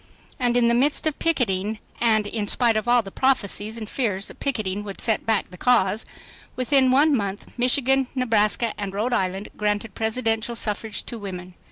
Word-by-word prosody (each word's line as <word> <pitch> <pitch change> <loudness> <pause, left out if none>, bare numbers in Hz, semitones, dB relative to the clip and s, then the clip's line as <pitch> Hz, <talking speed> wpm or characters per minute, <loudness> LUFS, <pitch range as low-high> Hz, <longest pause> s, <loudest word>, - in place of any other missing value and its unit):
And 245 -1 +2
in 240 -1 +4
the 235 - +3
midst 275 +7 +2
of 310 -2 -1
picketing 220 - 0 0.2
ands 215 -3 +2
in 210 -1 -3
spite 235 +1 +2
of 215 +2 -1
all 240 -1 +4
the 195 - -9
prophecies 220 -4 0
and 220 -2 -6
fears 205 -6 -2
that - - -13
"picketing" 210 -7 -2
would 200 -2 -8
"set 225 -1 0
back 220 -4 0
the 180 - -12
cause," 220 -4 +2 0.5
within 260 +1 +3
one 285 +3 +4
month, 200 -3 -4
Michigan, 265 +1 +2
Nebraska 225 -2 +1
and 195 -1 -4
Rhode 230 +5 -1
Island 190 -2 -1
granted 210 +1 -1
Presidential 225 0 -1
suffrage 215 -1 -1
to 235 - -7
women. 185 -3 -7
225 Hz, 180 wpm, -23 LUFS, 205-250 Hz, 0.5 s, in